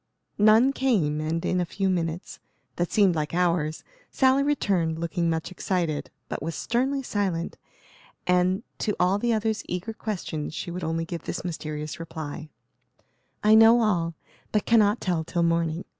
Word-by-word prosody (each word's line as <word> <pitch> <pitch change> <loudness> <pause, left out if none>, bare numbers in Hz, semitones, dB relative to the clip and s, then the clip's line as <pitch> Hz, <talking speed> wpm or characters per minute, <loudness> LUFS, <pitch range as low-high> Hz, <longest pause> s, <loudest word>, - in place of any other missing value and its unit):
None 220 +6 +6
came, 185 - +1
and 160 +2 -2
in 180 - +1
a - - +2
few 195 +3 -2
minutes, 170 -2 -2 0.4
that 175 0 -1
seemed 200 -4 +4
like 155 0 -2
hours, 170 -3 0 0.3
Sally 265 0 +3
returned, 195 - +1
looking 170 +1 -1
much 160 +2 -2
excited; 175 -5 -2 0.2
but - - -5
was 165 +3 -4
sternly 265 +4 0
silent, 190 -8 -2 0.7
and, 180 +3 +2 0.2
to 210 - -1
all 185 +3 +3
the 240 +2 +1
other's 220 -1 0
eager 180 +5 -4
questions 175 -9 -4
she 175 - -4
would 180 +1 -5
only 165 +1 -1
give 170 -1 -6
this 175 - -4
mysterious 155 -3 -5
reply: 160 -2 -6 0.9
"I 215 +1 +6
know 225 +2 +7
all, 170 -6 0 0.4
but 210 - +1
cannot 215 -1 +4
tell 175 -4 0
till 170 +1 -1
morning. 165 0 0
180 Hz, 160 wpm, -26 LUFS, 165-215 Hz, 0.9 s, know